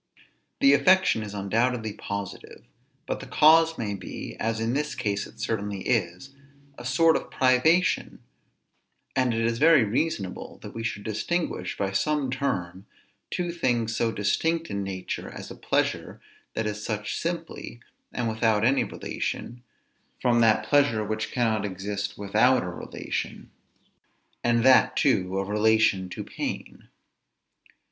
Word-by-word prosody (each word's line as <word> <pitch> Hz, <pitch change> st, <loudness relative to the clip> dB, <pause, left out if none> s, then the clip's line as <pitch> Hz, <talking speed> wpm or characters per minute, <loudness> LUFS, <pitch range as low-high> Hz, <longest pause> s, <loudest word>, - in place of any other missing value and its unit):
The 275 Hz, 0 st, +7 dB
affection 185 Hz, -, +4 dB
is 105 Hz, -1 st, -6 dB
undoubtedly 110 Hz, +3 st, 0 dB
positive; 100 Hz, -2 st, -7 dB, 0.4 s
but -, -, -3 dB
the -, -, -9 dB
cause 160 Hz, +1 st, +5 dB
may 105 Hz, -3 st, -2 dB
be, 95 Hz, -3 st, -7 dB
as 110 Hz, 0 st, -1 dB
in 115 Hz, +2 st, -1 dB
this 150 Hz, +2 st, -1 dB
case 100 Hz, -1 st, -2 dB
it -, -, -18 dB
certainly 105 Hz, -3 st, -2 dB
is, 115 Hz, +3 st, -1 dB, 0.4 s
a 120 Hz, -, -10 dB
sort 160 Hz, +6 st, +4 dB
of -, -, -3 dB
privation. 140 Hz, +8 st, +2 dB, 1.0 s
And 130 Hz, -2 st, +2 dB
it 115 Hz, 0 st, -1 dB
is 115 Hz, 0 st, 0 dB
very 155 Hz, -4 st, +6 dB
reasonable 105 Hz, -, -2 dB
that -, -, -8 dB
we 115 Hz, -, -5 dB
should 115 Hz, -3 st, -3 dB
distinguish 160 Hz, -, -2 dB
by 100 Hz, -1 st, -1 dB
some 145 Hz, +5 st, 0 dB
term 95 Hz, -9 st, -3 dB, 0.4 s
two 175 Hz, -1 st, -2 dB
things 120 Hz, -9 st, 0 dB
so 115 Hz, 0 st, +1 dB
distinct 165 Hz, +11 st, 0 dB
in 100 Hz, -, -2 dB
nature, 95 Hz, -1 st, -5 dB
as -, -, -9 dB
a -, -, -8 dB
pleasure -, -, -1 dB, 0.4 s
that 110 Hz, -, -1 dB
is 105 Hz, 0 st, -3 dB
such 105 Hz, -2 st, -3 dB
simply, 165 Hz, -7 st, -5 dB, 0.3 s
and 120 Hz, -, -2 dB
without 110 Hz, -1 st, +2 dB
any 135 Hz, +3 st, +3 dB
relation, 120 Hz, +1 st, -5 dB, 0.6 s
from 120 Hz, -1 st, +2 dB
that 110 Hz, -2 st, +4 dB
pleasure 140 Hz, -7 st, +3 dB
which 110 Hz, +1 st, -3 dB
cannot 110 Hz, -4 st, +1 dB
exist 100 Hz, +1 st, -4 dB
without 110 Hz, +6 st, +3 dB
a 90 Hz, -, -4 dB
relation, 90 Hz, -, -5 dB, 0.9 s
and 120 Hz, -1 st, +2 dB
that, 130 Hz, 0 st, +5 dB
too, 95 Hz, -10 st, +2 dB
a 95 Hz, -, -1 dB
relation 105 Hz, -2 st, +2 dB
to -, -, -6 dB
pain. -, -, -6 dB
115 Hz, 140 wpm, -26 LUFS, 100-135 Hz, 1.0 s, The